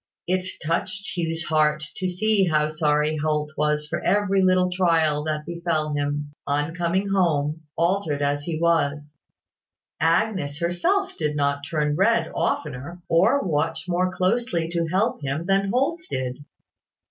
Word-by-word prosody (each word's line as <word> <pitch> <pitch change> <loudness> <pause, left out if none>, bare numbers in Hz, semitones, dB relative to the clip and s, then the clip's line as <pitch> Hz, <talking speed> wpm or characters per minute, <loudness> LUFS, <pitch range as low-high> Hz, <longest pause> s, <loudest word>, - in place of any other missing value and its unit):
It 185 +1 0 0.2
touched 185 +4 -2
Hugh's 165 -1 -2
heart 150 -1 +2
to 185 -1 -1
see 200 +2 +2
how 155 -2 +2
sorry 150 0 +1
Holt 150 0 -1
was 150 0 0
for 150 - -3
every 195 0 +2
little 185 -1 +3
trial 165 -5 +2
that 150 -1 -2
befel 170 -3 -2
him, 145 0 -2 0.2
on 145 +3 0
coming 180 +3 0
home, 160 -5 +1 0.2
altered 170 -4 +1
as 145 0 0
he 155 +1 -4
was. 150 -3 +1 0.8
Agnes 165 -2 +1
herself 345 - 0
did 150 -2 -1
not 140 0 0
turn 150 -2 0
red 230 +7 +2
oftener, 150 +4 -2
or 220 +12 +4
watch 160 +1 -1
more 180 +1 +1
closely 185 -2 0
to 170 -1 -1
help 190 +4 0
him 140 +4 -3
than 195 +1 +2
Holt 275 +9 +1
did. 130 +2 -4
165 Hz, 145 wpm, -24 LUFS, 150-185 Hz, 0.8 s, or